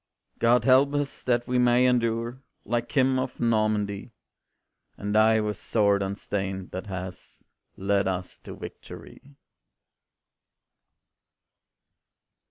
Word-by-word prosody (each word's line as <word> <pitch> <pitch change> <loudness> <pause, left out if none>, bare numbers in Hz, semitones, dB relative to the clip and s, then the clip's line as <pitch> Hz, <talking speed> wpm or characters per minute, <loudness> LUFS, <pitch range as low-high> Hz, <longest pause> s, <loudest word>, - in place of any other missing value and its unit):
God 120 0 +4
help 135 +2 +5
us, 145 -1 -3
that 120 -1 0
we 125 0 +1
may 125 0 +4
endure 120 0 0 0.2
Like 120 +2 -2
him 130 -2 +3
of 130 0 -4
Normandy; 110 -2 0 0.8
And 105 0 -3
die 110 +1 +5
with 105 -2 -2
sword 100 -2 +1
unstained, 95 -1 -4
that 95 +3 -6
has 95 -1 -8 0.3
Led 100 0 +1
us 90 -1 -4
to - - -10
victory. 140 +1 -11
110 Hz, 105 wpm, -26 LUFS, 100-125 Hz, 0.8 s, help